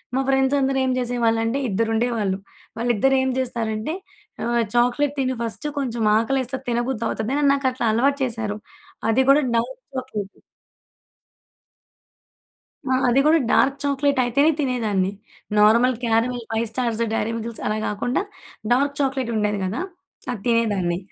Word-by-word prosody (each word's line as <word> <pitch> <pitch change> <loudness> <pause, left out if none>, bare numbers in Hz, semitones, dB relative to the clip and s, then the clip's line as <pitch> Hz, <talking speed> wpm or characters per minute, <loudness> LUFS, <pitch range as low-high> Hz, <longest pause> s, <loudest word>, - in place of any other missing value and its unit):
మా - - +2
ఫ్రెండ్స్ 270 +1 +3
అందరు 270 0 +1
ఏం 260 - +1
చేసేవాళ్ళంటే 235 0 0
ఇద్దరుండేవాళ్ళు. 225 -1 0 0.4
వాళ్ళిద్దరేం 260 +3 +2
జేస్తారంటే 235 0 -2 0.5
ఆహ్, 235 0 +1
"చాక్లెట్ 250 +4 +2
తిను 260 -1 0
ఫస్టు 235 +6 -3
కొంచెం 240 -4 -2
ఆకలేస్తే 260 +3 0
అది 265 - -23
తినబుద్ది 240 -1 -1
అవుతది" 220 +4 -2
అని 295 - +1
నాకట్లా 260 -3 0
అలవాటు 275 +5 +2
చేసారు. 225 -4 -2 0.5
అది 250 +4 +3
గూడా 290 +2 +6
డార్క్ 245 +3 -2 0.2
చాక్లెట్. 215 -6 -5 2.5
ఆ! - - +4 0.2
అది 250 +3 +4
గూడా 320 +2 +5
డార్క్ 275 +1 +3
చాక్లెట్ 280 0 +1
అయితేనే 280 +6 +3
తినేదాన్ని. 220 -9 0 0.5
Normal 230 +5 +5
caramel, 235 +1 +1
five 225 +1 0
stars, 235 -1 -1
dairy 225 0 0
మిల్‌కిల్స్ 230 0 -5
అలా 215 - 0
గాకుండా 245 - -1 0.5
డార్క్ 280 +3 +2
చాక్లేట్ 265 -3 0
ఉండేది 210 -1 0
గదా! 200 - -2 0.5
అది 230 -5 -5
తినేదాన్ని. 205 -7 +1
240 Hz, 130 wpm, -22 LUFS, 225-265 Hz, 2.5 s, గూడా